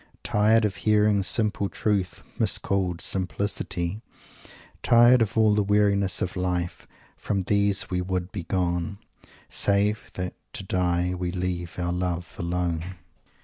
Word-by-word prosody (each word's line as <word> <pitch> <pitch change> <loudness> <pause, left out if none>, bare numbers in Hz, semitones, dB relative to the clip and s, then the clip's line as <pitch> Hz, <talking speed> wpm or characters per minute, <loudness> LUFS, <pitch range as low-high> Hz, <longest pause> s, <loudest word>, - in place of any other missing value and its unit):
Tired 110 +2 +3
of 100 -4 -2
hearing 105 0 +3
"simple 105 0 +2
truth 100 -4 -1 0.2
miscalled 95 -3 0
simplicity"; 95 0 -3 0.8
tired 120 +1 +6
of 110 0 0
all 110 -1 +5
the 105 - +2
weariness 100 -2 +2
of 90 - -4
life 90 -1 -2 0.3
from 100 -2 -2
these 100 0 +1
we 90 0 0
"would 90 0 -3
begone" 90 0 -2 0.5
"save 105 +2 +1
that 90 -1 -3 0.2
to - - -4
die 90 -1 0
we 90 -1 -3
leave 90 -2 -4
our 90 -1 -1
love 90 -1 -3
alone"! 85 0 -2
95 Hz, 125 wpm, -25 LUFS, 90-105 Hz, 0.8 s, tired